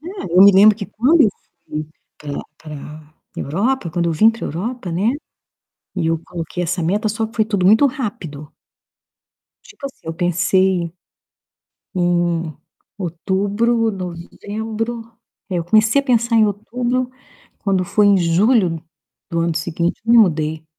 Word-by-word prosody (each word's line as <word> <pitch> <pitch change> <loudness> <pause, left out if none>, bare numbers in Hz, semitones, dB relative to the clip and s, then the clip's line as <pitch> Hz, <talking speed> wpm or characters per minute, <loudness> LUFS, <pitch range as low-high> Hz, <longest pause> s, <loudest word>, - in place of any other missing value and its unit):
É, 370 +5 -8
eu 185 - +9
me 200 - +8
lembro 205 +2 +6
que 205 -3 -6
quando 290 +9 +3
eu 220 - +5 0.4
fui 155 0 -4 0.3
pra 145 -1 -5 0.2
pra 150 0 -10 0.2
Europa, 200 - -1
quando 170 +1 -1
eu - - 0
vim 215 +8 +5
pra 230 - -7
Europa, 195 - -4
né, 195 +7 +1 0.9
e 170 -3 0
eu 165 0 +1
coloquei 175 0 -5
essa 175 +1 -2
meta 205 +7 0
só 220 +1 -2
que 225 - -16
foi 220 - +3
tudo 200 -4 0
muito 220 +8 +6
rápido. 185 - -5 1.1
Tipo 275 - -9
assim, 275 +1 -12
eu 165 - -3
pensei 180 0 +1 1.0
em 175 -3 0 0.4
outubro, 205 +6 0
novembro, 220 +5 -5 0.4
é, 180 - -1
eu 170 - -3
comecei 220 +8 +4
a - - -12
pensar 235 -3 +2
em 220 -1 +5
outubro, 245 +5 -2 0.5
quando 190 -2 0
foi 210 +3 +2
em 200 - +5
julho 175 0 +2 0.5
do 170 -1 -1
ano 165 0 0
seguinte, 170 +2 -2
eu 230 - +3
me 235 - +8
mudei. 160 -6 +2
190 Hz, 150 wpm, -19 LUFS, 170-225 Hz, 1.1 s, eu